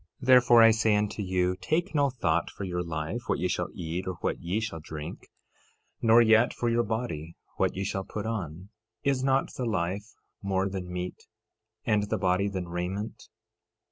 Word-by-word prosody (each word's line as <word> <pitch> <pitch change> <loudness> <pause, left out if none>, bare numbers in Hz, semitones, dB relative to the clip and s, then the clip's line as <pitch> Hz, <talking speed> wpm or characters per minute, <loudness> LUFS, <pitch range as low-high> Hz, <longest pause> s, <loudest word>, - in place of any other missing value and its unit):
Therefore 125 -2 +7
I 115 - +8
say 110 -1 +3
unto 105 0 -1
you, 90 -1 +1
take 160 - -1
no 145 -2 +3
thought 85 -10 0
for - - -8
your 90 -2 -2
life, 80 -3 -3
what - - +2
ye - - 0
shall - - -1
eat, 85 +3 -4
or 95 - -2
what - - -1
ye 90 +5 -1
shall 110 -7 -4
drink; 80 +1 -8 0.7
nor 115 +1 +6
yet 110 +2 +4
for 120 - 0
your 115 0 +3
body, 105 -8 -3 0.2
what - - +1
ye 95 - -2
shall 95 0 -2
put 105 +2 -5
on. 95 -5 -4 0.3
Is 135 -2 +1
not 135 0 +1
the 125 - -3
life 100 +1 -2 0.3
more 95 -1 0
than 95 -2 -5
meat, 90 0 -5 0.6
and 105 -2 +1
the - - 0
body 95 +1 +1
than 95 -3 -4
raiment? 90 +5 -4
100 Hz, 180 wpm, -28 LUFS, 90-115 Hz, 0.7 s, I